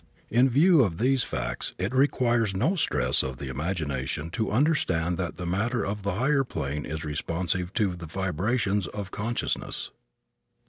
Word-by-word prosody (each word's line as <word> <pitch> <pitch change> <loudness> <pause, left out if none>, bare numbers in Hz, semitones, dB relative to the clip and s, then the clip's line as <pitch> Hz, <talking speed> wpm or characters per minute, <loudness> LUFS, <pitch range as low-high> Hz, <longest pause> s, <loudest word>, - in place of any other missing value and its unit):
In 125 +4 +5
view 155 +5 +5
of 95 -9 +1
these 130 +4 +2
facts 60 0 -3
it 95 +7 -2
requires 120 -6 +2
no 165 - +2
stress 65 - +2
of 65 -1 -4
the 70 0 -5
imagination 75 0 -2
to 110 +2 -1
understand 95 - +1
that 90 -2 -3
the 90 - -4
matter 105 +6 0
of 100 +1 -3
the 100 -1 -1
higher 135 +5 +2
planes 75 - -4
is 80 0 -4
responsive 85 +4 -1
to 100 -6 +1
the 85 -1 -8
vibrations 100 +4 0
of 100 -2 -6
consciousness. 115 +3 -2
95 Hz, 155 wpm, -27 LUFS, 80-120 Hz, -, In